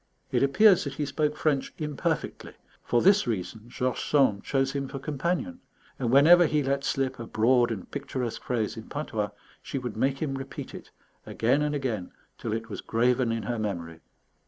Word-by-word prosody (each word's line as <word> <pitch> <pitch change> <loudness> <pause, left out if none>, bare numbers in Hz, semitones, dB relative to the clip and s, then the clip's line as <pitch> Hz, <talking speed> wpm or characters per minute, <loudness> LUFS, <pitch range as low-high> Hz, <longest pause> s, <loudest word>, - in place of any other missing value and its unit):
It - - +2
appears 185 +8 +5
that 140 -2 -5
he 150 - -1
spoke 150 +2 -1
French 145 -4 0
imperfectly; 150 -3 -3 0.3
for 120 - +1
this 195 -3 +5
reason 110 0 -3
George 125 +1 -2
Sand 130 -9 +2
chose 135 -1 0
him 140 -1 -3
for 135 - -6
companion, 170 - -2 0.4
and 125 -3 0
whenever 165 +7 +7
he 150 -1 +1
let 140 +1 0
slip 135 -2 -1
a 115 - -6
broad 120 +2 +3
and 110 -5 -6
picturesque 130 -4 -4
phrase 115 -4 -1
in 110 - -9
patois, 110 -8 -2 0.3
she - - -5
would 125 -4 -4
make 135 +4 +1
him 145 -4 -2
repeat 135 0 -7
it - - -10 0.4
again 125 +6 +1
and 150 0 0
again 115 -10 -3 0.3
till 115 - -4
it 115 +1 -3
was - - -6
graven 120 +1 +1
in 115 -1 -2
her 115 +3 -2
memory. 85 -6 -4
135 Hz, 180 wpm, -27 LUFS, 115-145 Hz, 0.4 s, whenever